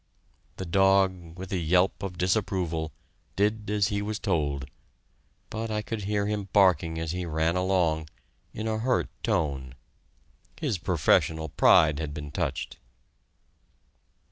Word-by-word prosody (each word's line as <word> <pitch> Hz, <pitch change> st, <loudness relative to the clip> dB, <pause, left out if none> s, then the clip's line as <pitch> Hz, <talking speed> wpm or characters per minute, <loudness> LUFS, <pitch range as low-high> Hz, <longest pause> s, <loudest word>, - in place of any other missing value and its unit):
The 95 Hz, -, -4 dB
dog, 95 Hz, -2 st, +2 dB
with 95 Hz, 0 st, -7 dB
a 95 Hz, -, 0 dB
yelp 90 Hz, +4 st, +2 dB
of 95 Hz, -3 st, -5 dB
disapproval, 90 Hz, -4 st, 0 dB, 0.4 s
did 105 Hz, +1 st, 0 dB
as 105 Hz, -1 st, +2 dB
he 100 Hz, -1 st, -1 dB
was 105 Hz, +1 st, -3 dB
told, 75 Hz, -9 st, -1 dB, 0.9 s
but 110 Hz, +1 st, -3 dB
I 105 Hz, -1 st, -2 dB
could 105 Hz, -2 st, -4 dB
hear 100 Hz, 0 st, 0 dB
him 105 Hz, -1 st, -3 dB
barking 85 Hz, -5 st, +3 dB
as 80 Hz, -1 st, -2 dB
he 90 Hz, +1 st, -3 dB
ran 80 Hz, 0 st, 0 dB
along 90 Hz, -4 st, +1 dB, 0.4 s
in 110 Hz, +1 st, -5 dB
a 110 Hz, 0 st, -1 dB
hurt 125 Hz, +2 st, +1 dB
tone. 70 Hz, -, -1 dB, 0.8 s
His 95 Hz, -, -1 dB
professional 80 Hz, -1 st, +2 dB
pride 75 Hz, +1 st, +5 dB
had 75 Hz, -2 st, -4 dB
been 75 Hz, -1 st, -6 dB
touched! -, -, -3 dB
90 Hz, 135 wpm, -27 LUFS, 80-100 Hz, 0.9 s, pride